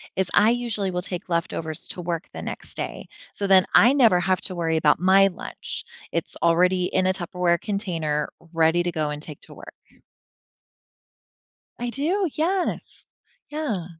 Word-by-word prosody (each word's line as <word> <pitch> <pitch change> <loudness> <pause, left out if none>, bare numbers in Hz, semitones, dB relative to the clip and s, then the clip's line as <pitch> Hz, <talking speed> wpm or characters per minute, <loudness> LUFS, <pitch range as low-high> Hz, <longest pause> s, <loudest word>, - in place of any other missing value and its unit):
is 190 -1 0
I 215 +2 +5
usually 235 -5 -1
will 180 0 -2
take 180 0 -5
leftovers 165 -2 -3
to 180 - -5
work 170 -1 -3
the - - -7
next - - -6
day, - - -5 0.3
so 200 - -3
then 190 -1 +6
I 245 - +7
never 230 -10 +5
have 185 +1 +1
to 185 - -5
worry 165 -2 0
about 155 -1 +3
my 190 +2 +5
lunch. 180 - -6 0.3
It's - - -2
already 180 +2 +3
in 185 0 +1
a 185 - +3
Tupperware 175 -1 0
container 165 -8 -2 0.2
ready 165 +1 +3
to 175 - -1
go 155 -2 -1
and 150 0 -5
take 150 -2 -9
to - - -14
work. - - -12 2.1
I 245 - -3
do, 340 +9 0
yes, 360 +4 -2 0.5
yeah. 270 - -3
180 Hz, 165 wpm, -24 LUFS, 170-210 Hz, 2.1 s, I